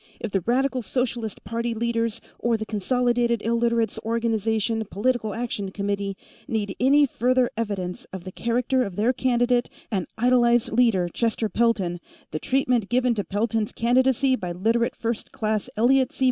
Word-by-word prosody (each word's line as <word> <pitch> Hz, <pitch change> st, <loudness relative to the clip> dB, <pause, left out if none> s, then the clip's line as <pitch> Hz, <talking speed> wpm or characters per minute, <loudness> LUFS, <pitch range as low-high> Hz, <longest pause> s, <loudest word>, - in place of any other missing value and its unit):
If 230 Hz, -, -4 dB
the 195 Hz, -, +1 dB
Radical 255 Hz, +5 st, +1 dB
Socialist 235 Hz, -1 st, -3 dB
Party 230 Hz, +2 st, -2 dB
leaders, 230 Hz, 0 st, -1 dB, 0.2 s
or 235 Hz, -1 st, +1 dB
the 220 Hz, -, -4 dB
Consolidated 240 Hz, +2 st, +1 dB
Illiterates' 235 Hz, -1 st, +1 dB
Organization 225 Hz, -1 st, 0 dB
Political 220 Hz, 0 st, 0 dB
Action 220 Hz, -4 st, -3 dB
Committee, 200 Hz, 0 st, -3 dB, 0.3 s
need 205 Hz, -3 st, -2 dB
any 285 Hz, +4 st, +5 dB
further 250 Hz, -1 st, +1 dB
evidence 200 Hz, -5 st, -3 dB
of 190 Hz, -2 st, -9 dB
the 185 Hz, -, -7 dB
character 245 Hz, +5 st, 0 dB
of 200 Hz, -6 st, -5 dB
their 225 Hz, +6 st, +2 dB
candidate 245 Hz, -1 st, +1 dB, 0.2 s
and 190 Hz, -4 st, -1 dB
idolized 240 Hz, 0 st, +3 dB
leader, 220 Hz, -7 st, +3 dB
Chester 225 Hz, +3 st, -1 dB
Pelton, 195 Hz, -6 st, +1 dB, 0.3 s
the 155 Hz, -, -3 dB
treatment 250 Hz, -, +1 dB
given 250 Hz, 0 st, +2 dB
to 210 Hz, -3 st, -2 dB
Pelton's 215 Hz, +2 st, -1 dB
candidacy 260 Hz, +2 st, +2 dB
by 180 Hz, -7 st, -4 dB
Literate 225 Hz, +6 st, +1 dB
First 230 Hz, -1 st, -3 dB
Class 215 Hz, +2 st, -2 dB
Elliot 255 Hz, +3 st, +3 dB
C. -, -, -14 dB
230 Hz, 150 wpm, -24 LUFS, 210-245 Hz, 0.3 s, any